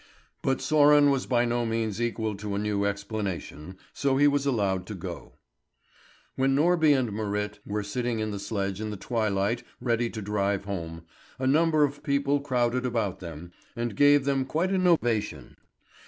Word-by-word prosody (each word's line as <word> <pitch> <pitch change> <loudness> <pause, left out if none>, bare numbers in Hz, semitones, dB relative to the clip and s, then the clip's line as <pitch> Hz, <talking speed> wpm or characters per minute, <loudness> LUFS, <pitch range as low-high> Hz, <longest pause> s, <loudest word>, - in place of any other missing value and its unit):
But 135 - +1
Sören 145 -1 +5
was 135 -2 -1
by 120 -1 +2
no 120 0 0
means 115 -2 -2
equal 110 -2 -1
to 100 0 -4
a - - -1
new 100 -1 0
explanation, 100 -4 -4 0.2
so 135 -1 +1
he 145 +1 +5
was 140 -1 +1
allowed 100 -8 0
to 105 - -6
go. 90 -2 -8 1.0
When 135 +1 +2
Norby 160 +1 +4
and 120 -5 -1
Marit 105 0 -3
were 105 0 -2
sitting 120 +3 -2
in 110 -1 -2
the 100 - -4
sledge 100 -1 -3
in 110 - -3
the 105 - -5
twilight 110 0 -1 0.2
ready 120 -1 0
to 110 - -6
drive 100 -1 -1
home, 85 -4 -5 0.3
a 130 - -3
number 155 +2 +3
of 145 0 -1
people 140 -1 +1
crowded 125 -3 0
about 115 -7 -1
them, 85 -1 -9 0.2
and 120 -3 -3
gave 145 +2 +5
them 135 -1 +1
quite 165 +8 -1
an 185 -2 +2
ovation. 120 -11 0
115 Hz, 170 wpm, -27 LUFS, 100-135 Hz, 1.0 s, Sören